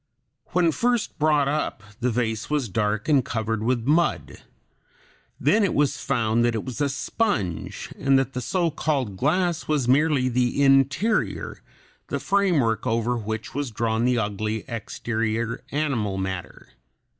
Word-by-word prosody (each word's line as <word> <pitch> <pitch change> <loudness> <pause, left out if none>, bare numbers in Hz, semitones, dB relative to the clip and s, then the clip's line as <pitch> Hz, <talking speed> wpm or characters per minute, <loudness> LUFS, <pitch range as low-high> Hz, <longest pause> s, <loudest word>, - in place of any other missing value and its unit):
When 175 -2 +2
first 240 +5 0
brought 150 -2 +3
up 145 -7 -2 0.2
the 125 +1 +1
vase 110 -2 -1
was 145 -6 0
dark 105 +1 -1
and 145 -4 +4
covered 110 -1 -2
with 120 0 0
mud; 160 +5 +1 1.0
then 215 0 +3
it 195 - +1
was 145 -1 +2
found 115 0 +1
that 120 -1 +1
it 110 - -3
was 130 +1 -5
a 145 - +2
sponge, 120 - -2
and 135 0 +3
that 135 0 0
the 125 - -3
so 170 +6 0
called 140 -9 -1
glass 165 - 0
was 145 -5 +1
merely 140 0 +3
the 125 +2 +1
interior, 135 - +2 0.5
the - - -2
framework 165 - +1
over 115 +2 +1
which 110 -1 -4
was 145 -1 -2
drawn 110 0 -1
the 125 0 +2
ugly 110 0 -2
exterior 115 -1 -3
animal 130 -10 -1
matter. 95 -8 -5
125 Hz, 145 wpm, -24 LUFS, 110-150 Hz, 1.0 s, and